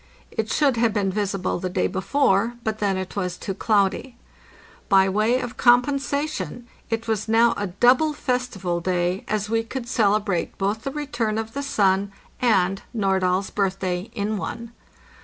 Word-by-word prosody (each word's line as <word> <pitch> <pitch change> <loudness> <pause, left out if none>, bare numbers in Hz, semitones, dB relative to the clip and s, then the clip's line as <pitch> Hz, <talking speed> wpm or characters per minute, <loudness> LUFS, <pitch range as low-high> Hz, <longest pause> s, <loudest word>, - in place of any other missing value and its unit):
It 220 0 -2
should 275 -5 +2
have 230 -2 +2
been 200 -3 0
visible 195 -2 -1
the 185 - -3
day - - 0
before, 200 +3 +1
but 220 0 -2
then 200 -2 +1
it 185 -1 -5
was 180 -3 -2
too 195 - -4
cloudy. 210 +5 0 0.7
By 195 -1 +5
way 215 +6 +2
of 245 -3 -6
compensation 250 - +1 0.2
it 225 0 -2
was 215 -1 -1
now 230 +1 +4
a 205 -2 -2
double 250 - +3
festival 250 -11 -2
day, 180 +1 -1
as 210 -1 -1
we 225 +1 +1
could 235 +2 -6
celebrate 205 -6 +1
both 205 +3 -2
the 275 - -2
return 240 -7 -2
of 225 0 -4
the 280 - -3
sun 200 -7 +1 0.3
and 195 -5 +2
Nordahl's 190 -2 +1
birth 195 -2 0
day 185 +2 -3
in 210 0 -1
one. 230 +7 -5
215 Hz, 160 wpm, -23 LUFS, 190-240 Hz, 0.7 s, By